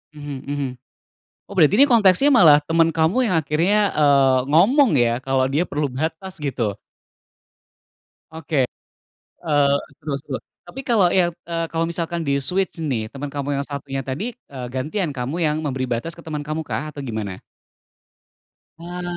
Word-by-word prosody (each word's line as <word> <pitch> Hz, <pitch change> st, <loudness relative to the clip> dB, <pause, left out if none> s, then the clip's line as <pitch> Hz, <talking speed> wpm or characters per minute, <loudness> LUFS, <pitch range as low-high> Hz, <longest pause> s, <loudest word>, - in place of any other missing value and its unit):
Mhm 145 Hz, -1 st, -6 dB
mhm. 140 Hz, -2 st, -2 dB, 0.8 s
Oh -, -, -8 dB
berarti 160 Hz, +4 st, +5 dB
ini 280 Hz, +3 st, +7 dB
konteksnya 225 Hz, +5 st, +5 dB
malah 155 Hz, -, +7 dB
temen 165 Hz, +1 st, +2 dB
kamu 180 Hz, +11 st, +2 dB
yang 185 Hz, -, 0 dB
akhirnya, 185 Hz, +8 st, +2 dB
eee, 140 Hz, -3 st, +4 dB
ngomong 215 Hz, -, +4 dB
ya, 120 Hz, -2 st, +2 dB
kalau 135 Hz, 0 st, 0 dB
dia 155 Hz, +6 st, +1 dB
perlu 145 Hz, -2 st, -2 dB
batas 160 Hz, +7 st, -4 dB
gitu? 115 Hz, -8 st, -2 dB, 1.5 s
Oke, 150 Hz, -5 st, -1 dB, 0.8 s
eee, 145 Hz, -3 st, +3 dB, 0.2 s
seru 145 Hz, -3 st, -3 dB
seru, 140 Hz, -1 st, -5 dB, 0.3 s
tapi 270 Hz, 0 st, -9 dB
kalau 200 Hz, -7 st, +3 dB
yang, 175 Hz, -2 st, +2 dB
eee, 165 Hz, 0 st, -3 dB
kalau 165 Hz, 0 st, -1 dB
misalkan 170 Hz, 0 st, -2 dB
di-switch 165 Hz, +6 st, -1 dB
nih, 120 Hz, -9 st, -2 dB
temen 145 Hz, +1 st, -6 dB
kamu 140 Hz, 0 st, -3 dB
yang 140 Hz, -, -3 dB
satunya 135 Hz, -1 st, -5 dB
tadi, 135 Hz, -, -4 dB, 0.2 s
eee, 130 Hz, -3 st, -7 dB
gantian 150 Hz, +6 st, -2 dB
kamu 130 Hz, +3 st, -4 dB
yang 155 Hz, 0 st, +1 dB
memberi 135 Hz, -4 st, -3 dB
batas 125 Hz, +6 st, -3 dB
ke 170 Hz, -, -14 dB
temen 155 Hz, -2 st, -4 dB
kamu 155 Hz, +1 st, -3 dB
kah 155 Hz, +1 st, -4 dB
atau 145 Hz, -2 st, -8 dB
gimana? 110 Hz, -6 st, -5 dB, 1.4 s
Ah. 175 Hz, +1 st, -7 dB
150 Hz, 155 wpm, -21 LUFS, 135-170 Hz, 1.5 s, ini